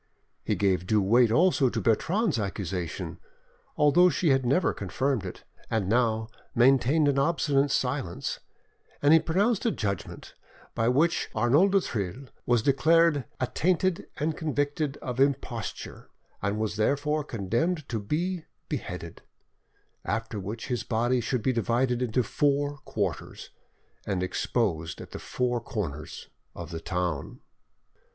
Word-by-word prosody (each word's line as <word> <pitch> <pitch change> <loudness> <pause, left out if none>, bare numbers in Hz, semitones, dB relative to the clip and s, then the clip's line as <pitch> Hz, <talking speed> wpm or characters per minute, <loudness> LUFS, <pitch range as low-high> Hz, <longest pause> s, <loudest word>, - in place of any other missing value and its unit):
He - - 0
gave 95 -3 +1
due 110 +1 +3
weight 115 +5 +4
also 155 0 +4
to - - -2
Bertrande's 170 - +1
accusation, 95 -4 -4 0.6
although 175 +5 +5
she 175 -1 +1
had 135 -2 +2
never 165 +8 +2
confirmed 130 +4 -1
it, 90 - -9 0.3
and 110 -4 0
now 110 0 +1 0.3
maintained 135 +5 +4
an 140 -1 +2
obstinate 145 -2 +2
silence; 130 -8 -2 0.6
and 145 +2 +6
he 160 - +8
pronounced 200 +7 +1
a 235 - +3
judgment 100 - -4 0.4
by 115 - 0
which 150 +7 +2
Arnauld 140 - +4
du 195 - +5
Thill 115 - -4 0.2
was 120 -2 +3
declared 150 +1 +4
"attainted 175 +7 0
and 155 +1 -1
convicted 145 -1 -1
of 125 0 -4
imposture, 135 -5 -2 0.3
and 100 +1 -1
was 110 -1 -2
therefore 145 +7 +1
condemned 140 - -1
to 115 - -1
be 165 - -2 0.2
beheaded; - - -5 0.8
after 115 -1 -3
which 105 +4 -5
his 125 -3 -1
body 120 +2 +1
should 120 -1 -2
be 130 - +2
divided 120 +2 +1
into 125 0 +1
four 145 +4 0
quarters, 95 - -4 0.6
and 95 -3 -1
exposed 90 -4 -1
at - - -10
the - - -6
four 125 -1 -1
corners 90 - -5 0.3
of 85 0 -7
the 80 -1 -5
town." 90 -5 -3
125 Hz, 135 wpm, -27 LUFS, 105-150 Hz, 0.8 s, he